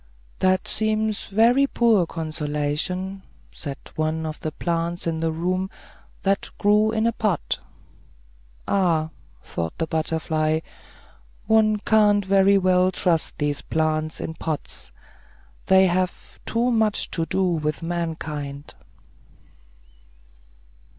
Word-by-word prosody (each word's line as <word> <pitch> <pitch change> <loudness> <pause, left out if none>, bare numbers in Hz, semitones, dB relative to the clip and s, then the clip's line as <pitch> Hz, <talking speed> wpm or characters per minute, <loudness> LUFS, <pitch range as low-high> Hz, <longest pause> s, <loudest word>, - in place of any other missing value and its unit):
"That 185 -1 +2
seems 215 0 0
very 235 +7 +4
poor 225 -9 +3
consolation," 160 +4 -2 0.3
said 140 -3 -6 0.2
one 155 +1 -1
of 155 -1 -5
the 155 - -3
plants 170 +2 -2
in 165 -1 -1
the 165 0 0
room, 185 +4 -1 0.5
that 195 +1 0
grew 210 +1 +3
in 220 0 0
a 230 - +3
pot. 210 -7 -1 1.1
"Ah," 165 -5 +1 0.3
thought 85 -1 -4
the 165 - 0
butterfly, 160 0 0 0.8
"one 215 -1 +4
can't 205 -1 +3
very 195 +1 +5
well 185 -1 +3
trust 170 -3 0
these 145 -1 0
plants 155 0 -1
in 160 - -4
pots; 160 -2 -4 0.8
they 190 0 +6
have 185 0 -2
too 240 +2 +1
much 220 -3 +1
to 165 -1 -1
do 190 +1 0
with 155 -3 -1
mankind." 155 -4 -4
175 Hz, 110 wpm, -23 LUFS, 155-200 Hz, 1.1 s, they